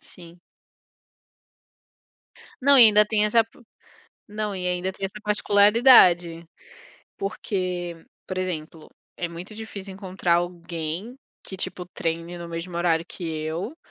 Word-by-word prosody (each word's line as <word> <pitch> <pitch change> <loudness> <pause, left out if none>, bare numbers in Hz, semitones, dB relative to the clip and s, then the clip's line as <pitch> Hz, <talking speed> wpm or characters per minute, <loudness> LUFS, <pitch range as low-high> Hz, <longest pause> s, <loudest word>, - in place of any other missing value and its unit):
Sim. 170 0 -16 2.2
Não 280 +1 +6
e - - +10
ainda 210 0 +6
tem 210 0 +1
essa 225 +1 +3
p 225 - -24 0.7
Não 210 -1 -4
e 180 -1 -3
ainda 180 +1 -1
tem 195 - -5
essa 205 +2 -8
particularidade. 205 -5 +5 0.7
Porque, 185 -4 -3 0.3
por 185 -1 -5
exemplo, 165 -3 -5 0.3
é 175 - -3
muito 175 +5 -9
difícil 205 -3 -8
encontrar 185 -3 -1
alguém 175 +5 -4 0.3
que, 190 - -8
tipo, 180 -1 -5
treine 170 0 -4
no 170 0 -8
mesmo 170 +1 -6
horário 170 -1 +1
que 180 - -8
eu, 160 - -4
180 Hz, 125 wpm, -24 LUFS, 170-210 Hz, 2.2 s, e